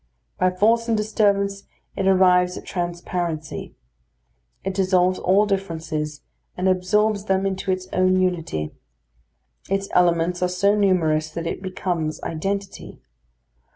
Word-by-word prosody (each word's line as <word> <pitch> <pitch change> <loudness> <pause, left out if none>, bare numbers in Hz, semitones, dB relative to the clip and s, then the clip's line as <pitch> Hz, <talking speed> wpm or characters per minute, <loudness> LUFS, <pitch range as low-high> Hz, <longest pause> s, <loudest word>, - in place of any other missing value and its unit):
By 185 - +4
force 225 +5 +2
and 225 -1 +2
disturbance, 200 -2 +1 0.3
it 195 - -1
arrives 180 -1 +4
at - - -9
transparency. 175 -2 -4 0.9
It 195 - -2
dissolves 185 -1 +2
all 195 +3 +3
differences, 160 -6 -3 0.4
and 185 +1 0
absorbs 200 +3 +1
them 190 -1 +1
into 190 0 -2
its 185 0 0
own 185 0 +3
unity. 165 - -1 1.0
Its 195 +1 -1
elements 175 0 +2
are 180 - +2
so 190 +3 +2
numerous 165 -7 +2
that 165 +2 -5
it 165 - -3
becomes 175 -4 -3
identity. 195 +4 -4
185 Hz, 120 wpm, -23 LUFS, 175-195 Hz, 1.0 s, By